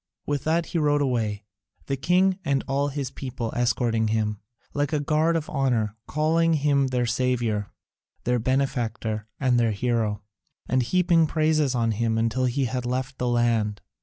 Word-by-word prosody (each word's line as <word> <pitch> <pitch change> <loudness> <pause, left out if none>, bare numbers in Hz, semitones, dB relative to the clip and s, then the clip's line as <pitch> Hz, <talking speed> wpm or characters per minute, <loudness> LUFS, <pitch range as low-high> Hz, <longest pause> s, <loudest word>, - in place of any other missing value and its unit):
With 145 -2 -2
that 165 +2 +2
he 170 - -2
rode 145 -1 +2
away, 110 -6 -1 0.4
the 135 - -1
king 185 +7 +2
and 140 -1 0
all 140 +1 +1
his 140 -2 -4
people 125 -4 -5
escorting 115 -2 +1
him, 105 -1 -1 0.3
like 145 +1 0
a 150 - +2
guard 155 +3 +1
of 160 -1 -1
honour, 120 -7 0
calling 165 +2 +2
him 140 -2 +2
their 125 -1 0
saviour, 120 -4 0 0.5
their 125 0 +1
benefactor, 115 -4 -1
and 125 -2 +2
their 115 -2 +2
hero, 110 -2 -1 0.4
and 130 +1 +2
heaping 170 +3 +3
praises 155 -3 +1
on 115 -2 +1
him 110 +1 0
until 115 +3 +1
he 130 +2 0
had 125 0 -2
left 130 +2 -3
the 125 - 0
land. 115 -4 +1
130 Hz, 165 wpm, -25 LUFS, 115-145 Hz, 0.5 s, heaping